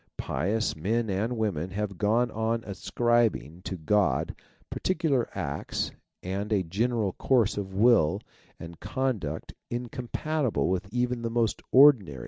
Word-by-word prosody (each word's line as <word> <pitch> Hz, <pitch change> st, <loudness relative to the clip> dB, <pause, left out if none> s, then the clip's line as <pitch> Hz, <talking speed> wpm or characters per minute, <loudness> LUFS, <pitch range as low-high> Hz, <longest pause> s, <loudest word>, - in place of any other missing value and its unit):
Pious 110 Hz, +4 st, -1 dB
men 110 Hz, +7 st, -1 dB
and 110 Hz, +6 st, -1 dB
women 95 Hz, -6 st, -1 dB
have 100 Hz, -1 st, -4 dB
gone 115 Hz, +4 st, +2 dB
on 110 Hz, +1 st, -1 dB
ascribing 110 Hz, -4 st, 0 dB
to 95 Hz, -, -4 dB
God 95 Hz, +3 st, +1 dB, 0.4 s
particular 155 Hz, -9 st, 0 dB
acts 70 Hz, +1 st, -3 dB, 0.3 s
and 100 Hz, +3 st, -3 dB
a 100 Hz, -3 st, +2 dB
general 105 Hz, +3 st, 0 dB
course 120 Hz, -6 st, +2 dB
of 95 Hz, -2 st, -5 dB
will 100 Hz, -5 st, +4 dB, 0.4 s
and 85 Hz, 0 st, -9 dB
conduct 110 Hz, -, -3 dB, 0.2 s
incompatible 125 Hz, +3 st, -2 dB
with 95 Hz, +2 st, -2 dB
even 125 Hz, 0 st, -1 dB
the 115 Hz, -, -2 dB
most 115 Hz, -1 st, 0 dB
ordinary 125 Hz, -, +6 dB
110 Hz, 125 wpm, -27 LUFS, 95-120 Hz, 0.4 s, ordinary